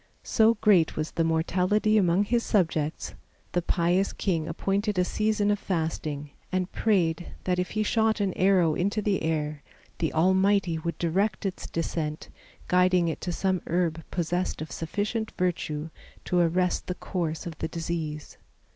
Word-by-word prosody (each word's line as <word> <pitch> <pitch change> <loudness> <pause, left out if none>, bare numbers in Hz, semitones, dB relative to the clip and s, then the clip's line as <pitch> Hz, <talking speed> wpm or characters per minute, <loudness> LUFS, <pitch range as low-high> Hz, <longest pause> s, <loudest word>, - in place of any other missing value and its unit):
So 225 0 +4
great 200 -7 +3
was 155 +1 -2
the 165 - 0
mortality 180 +6 +2
among 185 -2 +4
his 235 +3 +1
subjects, 160 -8 0 0.4
the 175 - +1
pious 175 +3 +1
king 165 -5 -1
appointed 195 +4 -1
a 180 - +3
season 210 +1 +1
of 205 - 0
fasting, 160 -5 -3 0.2
and 185 -1 -1
prayed 175 -6 0
that 180 -1 0
if 180 - -1
he 215 - +3
shot 220 0 +2
an 195 -3 0
arrow 185 -4 +3
into 200 +6 0
the 200 -2 +1
air 150 -2 -1 0.4
the 160 - 0
Almighty 190 0 +3
would 170 +1 -3
direct 190 +5 0
its 190 -2 -3
descent, 160 -1 -3 0.4
guiding 180 -1 +3
it 160 - -4
to 180 - -2
some 185 +1 0
herb 170 -2 0
possessed 175 +1 -1
of 155 -2 -6
sufficient 210 - -3
virtue 160 -3 -2 0.3
to 180 - +1
arrest 180 +1 +1
the 180 - -2
course 165 -4 -3
of 165 -3 -7
the - - -1
disease. 160 -2 -5
180 Hz, 155 wpm, -27 LUFS, 160-195 Hz, 0.4 s, So